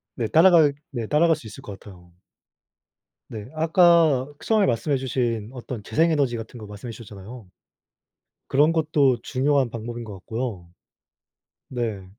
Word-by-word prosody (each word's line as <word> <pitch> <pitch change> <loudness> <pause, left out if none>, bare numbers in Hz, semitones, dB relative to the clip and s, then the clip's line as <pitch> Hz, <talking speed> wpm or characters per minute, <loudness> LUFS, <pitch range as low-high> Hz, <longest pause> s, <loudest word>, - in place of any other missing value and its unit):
네 115 - -2
따라갈 160 - +5 0.2
네 120 -5 -4
따라갈 160 +5 +3
수 145 - -13
있을 110 - -11
것 100 -2 -9
같아요. 90 -4 -15 1.2
네 105 -2 -8
아까 160 -4 +4 0.2
처음에 215 -3 +3
말씀해 135 +4 0
주신 120 -4 -2
어떤 125 -3 -7
재생 160 +11 +1
에너지 140 -6 +1
같은 115 +2 -9
거 110 - -9
말씀해 105 +3 -9
주셨잖아요. 110 0 -11 1.0
그런 150 +4 +3
것도 150 -6 +2
중요한 135 -1 +1
방법인 115 +1 -6
것 105 -2 -9
같고요. 110 -1 -5 1.0
네. 115 -6 -4
125 Hz, 290 characters per minute, -23 LUFS, 110-150 Hz, 1.2 s, 따라갈